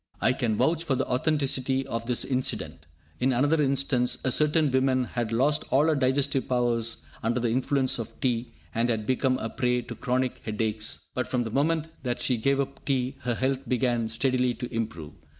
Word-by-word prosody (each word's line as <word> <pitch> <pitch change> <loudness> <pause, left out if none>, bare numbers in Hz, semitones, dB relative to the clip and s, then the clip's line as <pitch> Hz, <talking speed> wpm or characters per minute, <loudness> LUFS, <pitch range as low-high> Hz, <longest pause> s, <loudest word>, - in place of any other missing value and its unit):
I 130 - +3
can 120 -5 0
vouch 165 0 +2
for 140 -5 0
the - - 0
authenticity 135 -1 +1
of 115 -3 -4
this 125 -1 +2
incident. 130 - -2 0.3
In 130 +1 +2
another 145 +5 +2
instance, 135 -3 +2
a 130 - +2
certain 150 +1 +3
woman 130 0 +2
had 120 -2 -3
lost 135 +6 +2
all 140 +3 +4
her 160 - +3
digestive 135 0 +1
powers 120 -2 0 0.2
under 115 +2 0
the 120 -1 0
influence 130 +1 +1
of 115 - -7
tea, 125 -3 -1 0.2
and 115 +2 +1
had 110 -2 -1
become 130 +1 +1
a 115 - -3
prey 125 -2 0
to - - -7
chronic 125 0 -1
headaches; 110 0 -3
but 125 -1 -2
from 125 -1 0
the 115 - -5
moment 155 +4 +1 0.2
that 125 -2 -2
she 125 - 0
gave 135 +5 +1
up 140 - -3
tea 135 -1 -1
her 120 -1 -2
health 130 +2 0
began 120 -2 +1
steadily 125 +1 +1
to 125 0 -6
improve. 110 -10 -4
130 Hz, 190 wpm, -27 LUFS, 120-135 Hz, 0.3 s, all